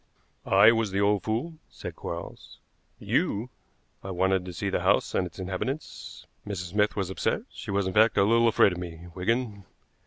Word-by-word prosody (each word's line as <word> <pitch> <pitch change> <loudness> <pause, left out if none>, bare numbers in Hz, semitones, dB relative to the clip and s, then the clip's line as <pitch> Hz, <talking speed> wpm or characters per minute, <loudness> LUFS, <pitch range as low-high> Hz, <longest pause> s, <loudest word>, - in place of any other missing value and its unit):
"I 100 +3 +7
was 115 -2 0
the 95 +1 -1
old 100 -1 +2
fool," 125 +9 -3
said - - -8
Quarles. 85 0 -8 0.4
"You?" 115 +5 -1 0.5
"I 95 - -6
wanted 95 0 +1
to 90 - -6
see 85 - -3
the - - +1
house - - +2
and 90 - +1
its 85 - -15
inhabitants. 95 +10 -5 0.2
Mrs. 90 -4 -5
Smith 105 +1 +1
was 95 -3 -2
upset; - - -1
she - - -9
was, 100 0 0
in 95 - -2
fact, 110 +2 +4
a - - +6
little 115 +3 +4
afraid 105 -3 +5
of 90 - -5
me, 85 -1 -8
Wigan. 105 +2 -1
100 Hz, 185 wpm, -27 LUFS, 95-110 Hz, 0.5 s, I